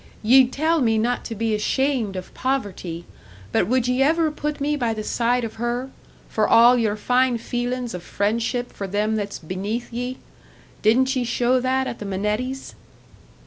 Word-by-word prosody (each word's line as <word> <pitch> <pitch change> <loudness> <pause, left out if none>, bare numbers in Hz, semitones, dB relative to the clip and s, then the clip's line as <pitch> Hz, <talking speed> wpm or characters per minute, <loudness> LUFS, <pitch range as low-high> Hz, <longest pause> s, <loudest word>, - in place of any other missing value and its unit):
Ye'd 255 +3 +6
tell 315 +3 +1
me 225 -3 +2
not 240 +3 0
to 230 - -5
be 225 +1 -1
ashamed 230 -1 0
of 185 -1 -7
poverty; 195 -10 -3 0.5
but - - +2
would 250 +1 +1
ye 250 +1 +1
ever 315 +2 +3
put 300 0 -4
me 295 +1 0
by 235 -5 -1
the 215 - -4
side 240 +3 +1
of 220 -1 -5
her 245 +2 -2 0.4
for - - +1
all 240 +2 +7
your 220 -4 +1
fine 250 +3 +2
feelin's 245 +1 -3
of 180 - -5
friendship 225 +6 -1
for 200 - -5
them 210 +3 0
that's 205 -1 -3
beneath 200 +9 -4
ye? 245 +2 -3 0.6
Didn't 260 +5 +3
ye 255 - +1
show 245 +1 +1
that 260 +1 0
at 235 - -5
the 210 - -6
Minettis'?" 210 +7 -3
240 Hz, 175 wpm, -23 LUFS, 215-260 Hz, 0.6 s, all